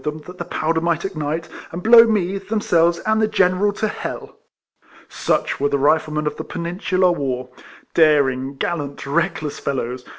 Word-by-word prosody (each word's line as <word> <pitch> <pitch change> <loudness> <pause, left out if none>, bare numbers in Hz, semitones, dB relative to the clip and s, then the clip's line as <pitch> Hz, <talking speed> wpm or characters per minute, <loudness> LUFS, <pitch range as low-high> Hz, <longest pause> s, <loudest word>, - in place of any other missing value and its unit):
159 150 0 -4
them, 180 +2 -11
that - - -21
the 175 - -6
powder 160 +1 0
might 170 +1 0
ignite, 160 -3 -3 0.2
and 175 +2 -6
blow 230 +1 +8
me, 195 -3 0
themselves, 175 -5 +1
and 220 0 +2
the 215 - +3
General 195 0 +2
to. 210 +1 -4 0.8
Such - - -1
were 145 +1 +1
the 140 - +1
Riflemen 150 +2 +1
of 150 - -2
the - - -4
Peninsular 180 +1 0
War, 130 -6 -3 0.2
— - - -25
daring, 140 -4 +3
gallant, 145 -2 -4
reckless 150 0 -1
fellows. 125 -2 -3
165 Hz, 165 wpm, -20 LUFS, 145-185 Hz, 0.8 s, blow